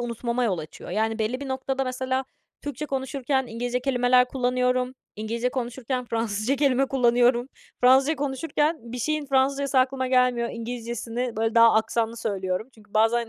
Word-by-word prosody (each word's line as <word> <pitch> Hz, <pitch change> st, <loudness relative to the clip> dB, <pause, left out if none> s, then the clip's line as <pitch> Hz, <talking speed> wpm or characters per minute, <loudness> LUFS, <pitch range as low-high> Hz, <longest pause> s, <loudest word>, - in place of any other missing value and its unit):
unutmama 240 Hz, +1 st, -2 dB
yol 190 Hz, -6 st, 0 dB
açıyor. 155 Hz, 0 st, -9 dB
Yani, 220 Hz, +1 st, 0 dB
belli 225 Hz, +4 st, -1 dB
bir 280 Hz, -, -5 dB
noktada 265 Hz, 0 st, -2 dB
mesela 260 Hz, +1 st, -2 dB, 0.4 s
Türkçe 290 Hz, +1 st, -5 dB
konuşurken 265 Hz, -1 st, -1 dB
İngilizce 245 Hz, +2 st, -2 dB
kelimeler 250 Hz, -1 st, +3 dB
kullanıyorum. 250 Hz, 0 st, 0 dB, 0.2 s
İngilizce 230 Hz, +3 st, -2 dB
konuşurken 250 Hz, 0 st, -3 dB
Fransızca 225 Hz, +2 st, -1 dB
kelime 270 Hz, -1 st, +2 dB
kullanıyorum. 245 Hz, -1 st, +3 dB, 0.3 s
Fransızca 265 Hz, +5 st, +5 dB
konuşurken 290 Hz, -1 st, -1 dB
bir 250 Hz, -, -4 dB
şeyin 305 Hz, +3 st, -1 dB
Fransızcası 275 Hz, 0 st, +2 dB
aklıma 260 Hz, 0 st, +1 dB
gelmiyor, 250 Hz, -2 st, +2 dB
İngilizcesini, 235 Hz, 0 st, -4 dB
böyle, 225 Hz, +1 st, 0 dB
daha 230 Hz, 0 st, +7 dB
aksanlı 225 Hz, +1 st, 0 dB
söylüyorum. 195 Hz, 0 st, -2 dB
Çünkü 215 Hz, -1 st, -21 dB
bazen 225 Hz, +2 st, +3 dB
250 Hz, 145 wpm, -25 LUFS, 230-265 Hz, 0.4 s, daha